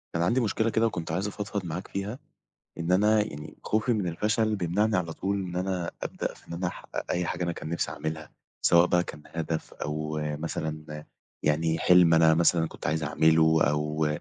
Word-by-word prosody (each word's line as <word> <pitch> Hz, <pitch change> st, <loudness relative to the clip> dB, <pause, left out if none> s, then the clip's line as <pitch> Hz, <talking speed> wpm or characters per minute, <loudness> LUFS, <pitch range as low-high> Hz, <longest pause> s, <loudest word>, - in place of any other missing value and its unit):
أنا 85 Hz, -, +2 dB
عندي 120 Hz, +8 st, +2 dB
مشكلة 110 Hz, 0 st, +1 dB
كده، 115 Hz, +1 st, +2 dB
وكنت 85 Hz, -7 st, -4 dB
عايز 95 Hz, +5 st, -1 dB
أفضفض 105 Hz, -1 st, -4 dB
معاك 85 Hz, +3 st, -5 dB
فيها، 100 Hz, +7 st, -4 dB, 0.6 s
إن 85 Hz, +2 st, -1 dB
أنا 105 Hz, +3 st, +4 dB
يعني 75 Hz, -7 st, -8 dB
خوفي 110 Hz, +3 st, +1 dB
من 105 Hz, -5 st, 0 dB
الفشل 105 Hz, +5 st, 0 dB
بيمنعني 100 Hz, +4 st, +1 dB
على 85 Hz, -3 st, -1 dB
طول 100 Hz, +4 st, -2 dB
إن 90 Hz, -1 st, -5 dB
أنا 90 Hz, -2 st, -1 dB
أبدأ -, -, -3 dB
في -, -, -21 dB
إن -, -, -7 dB
أنا 90 Hz, +2 st, -2 dB
أحقق 90 Hz, -, -5 dB
أي 90 Hz, -1 st, 0 dB
حاجة 90 Hz, -, -3 dB
أنا 85 Hz, -, -1 dB
كان 80 Hz, -, -7 dB
نفسي 85 Hz, -, -1 dB
أعملها، 80 Hz, -1 st, -5 dB, 0.3 s
سواء 85 Hz, 0 st, +6 dB
بقى 90 Hz, 0 st, +3 dB
كان 75 Hz, -, -9 dB
هدف، 80 Hz, -1 st, -4 dB
أو 75 Hz, +1 st, -3 dB, 0.2 s
مثلًا 75 Hz, -1 st, -5 dB, 0.4 s
يعني 80 Hz, +2 st, +1 dB
حِلم 90 Hz, -1 st, +6 dB
أنا 80 Hz, 0 st, +6 dB
مثلًا 85 Hz, 0 st, +3 dB
كنت -, -, -7 dB
عايز 80 Hz, +2 st, 0 dB
أعمله، 80 Hz, 0 st, +4 dB
أو 75 Hz, +1 st, +1 dB
85 Hz, 190 wpm, -27 LUFS, 80-100 Hz, 0.6 s, سواء